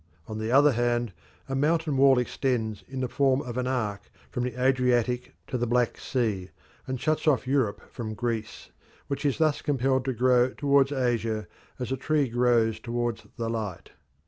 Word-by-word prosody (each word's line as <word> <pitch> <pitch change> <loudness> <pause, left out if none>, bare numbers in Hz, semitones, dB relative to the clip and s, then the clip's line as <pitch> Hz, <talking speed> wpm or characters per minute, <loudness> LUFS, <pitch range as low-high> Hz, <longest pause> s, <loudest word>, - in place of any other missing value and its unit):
On 110 -1 -6
the 110 +1 -2
other 145 +3 +6
hand, 120 -3 0 0.3
a 135 - -4
mountain 155 +2 +1
wall 135 -1 +6
extends 120 -4 -1
in 135 -1 -5
the 130 - 0
form 135 +1 +2
of 125 -4 -6
an 125 0 -1
arc 110 -6 -2 0.2
from 125 - -2
the 125 0 -4
Adriatic 125 -1 +1
to 125 - -3
the 120 - 0
Black 120 0 +1
Sea 105 -8 -1 0.4
and 130 -1 -3
shuts 155 +2 0
off 140 -5 +3
Europe 130 -6 0
from 110 -3 -5
Greece, 115 -2 -4 0.4
which 140 +1 -3
is 140 - 0
thus 155 -2 +2
compelled 130 -2 +1
to 130 - 0
grow 125 +1 +3
towards 140 -1 +3
Asia 115 -5 0 0.3
as 125 -1 -4
a 135 - 0
tree 150 +1 +1
grows 120 -2 +2
towards 120 -2 -3
the 115 - -2
light. 110 -6 -4
125 Hz, 175 wpm, -27 LUFS, 115-135 Hz, 0.4 s, other